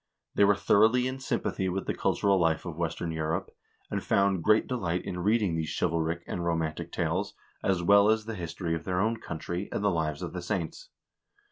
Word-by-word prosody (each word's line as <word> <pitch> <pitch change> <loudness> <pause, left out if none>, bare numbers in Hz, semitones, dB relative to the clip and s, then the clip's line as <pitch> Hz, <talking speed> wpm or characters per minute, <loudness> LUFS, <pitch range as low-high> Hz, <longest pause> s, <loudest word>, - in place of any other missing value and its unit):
They 100 - +5
were 100 0 +5
thoroughly 110 +5 +4
in 130 +1 -3
sympathy 95 -7 -1
with 95 +2 -2
the - - -1
cultural 100 -1 +2
life 80 -1 +1
of 85 -3 -5
western 85 0 -2
Europe, 80 +1 -2 0.4
and - - -2
found 100 -2 +2
great 105 +3 +4
delight 90 -9 -2
in 90 - -4
reading 105 -1 +2
these 80 -1 -2
chivalric 85 +1 0
and 85 - -4
romantic 80 -2 -2
tales, - - -1 0.3
as 95 -3 +1
well 100 +3 +6
as 110 -1 +2
the 115 - -4
history 85 -2 -4
of 80 -1 -3
their 90 0 -1
own 110 +3 +1
country, 85 -1 -5
and - - -2
the 100 - +3
lives 80 -4 -2
of - - -5
the - - -4
saints. - - -4
90 Hz, 200 wpm, -28 LUFS, 85-105 Hz, 0.4 s, well